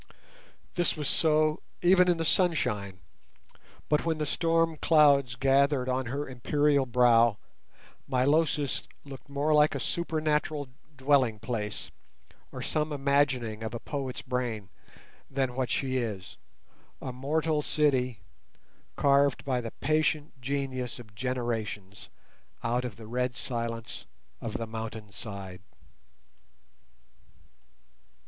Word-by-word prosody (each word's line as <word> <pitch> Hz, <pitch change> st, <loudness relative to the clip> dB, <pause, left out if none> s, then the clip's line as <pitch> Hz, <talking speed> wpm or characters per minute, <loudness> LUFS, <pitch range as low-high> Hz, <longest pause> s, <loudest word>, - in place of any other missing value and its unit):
This 175 Hz, -2 st, +1 dB
was 150 Hz, -2 st, -2 dB
so 155 Hz, -1 st, +3 dB, 0.2 s
even 180 Hz, +1 st, +6 dB
in 175 Hz, -, +3 dB
the 165 Hz, -, -1 dB
sunshine, 105 Hz, -, +1 dB, 0.9 s
but 150 Hz, -, +2 dB
when 165 Hz, -1 st, 0 dB
the 155 Hz, -, -1 dB
storm 165 Hz, +1 st, +1 dB
clouds 140 Hz, -6 st, +4 dB
gathered 135 Hz, 0 st, +3 dB
on 130 Hz, -1 st, -1 dB
her 140 Hz, +4 st, -3 dB
imperial 140 Hz, +2 st, +1 dB
brow 120 Hz, -2 st, +5 dB, 0.7 s
Milosis 145 Hz, +2 st, +1 dB, 0.2 s
looked 140 Hz, -1 st, -10 dB
more 145 Hz, +2 st, +1 dB
like 150 Hz, 0 st, +5 dB
a -, -, -1 dB
supernatural 155 Hz, -3 st, -1 dB, 0.3 s
dwelling 135 Hz, -5 st, +3 dB
place, 110 Hz, -1 st, -4 dB, 0.6 s
or -, -, -6 dB
some 155 Hz, 0 st, -1 dB
imagining 135 Hz, -6 st, +1 dB
of 110 Hz, +1 st, -4 dB
a -, -, -4 dB
poet's 135 Hz, -2 st, -4 dB
brain, 120 Hz, -6 st, -3 dB, 0.6 s
than 135 Hz, -2 st, -1 dB
what 130 Hz, 0 st, -1 dB
she 130 Hz, -1 st, 0 dB
is—a 115 Hz, +3 st, -8 dB
mortal 150 Hz, +4 st, 0 dB
city, 130 Hz, -7 st, +1 dB, 0.7 s
carven 140 Hz, -1 st, +4 dB
by 130 Hz, -3 st, 0 dB
the 115 Hz, -, -5 dB
patient 155 Hz, 0 st, 0 dB
genius 130 Hz, -2 st, -3 dB
of 110 Hz, -4 st, -12 dB
generations 110 Hz, -5 st, -3 dB, 0.5 s
out 120 Hz, +2 st, 0 dB
of 120 Hz, -4 st, -5 dB
the 115 Hz, -, -11 dB
red 125 Hz, +1 st, -2 dB
silence 115 Hz, -2 st, -4 dB, 0.3 s
of 115 Hz, -, -4 dB
the 115 Hz, -, -2 dB
mountain 110 Hz, -1 st, -6 dB
side. 100 Hz, -4 st, -7 dB
130 Hz, 115 wpm, -29 LUFS, 115-150 Hz, 0.9 s, even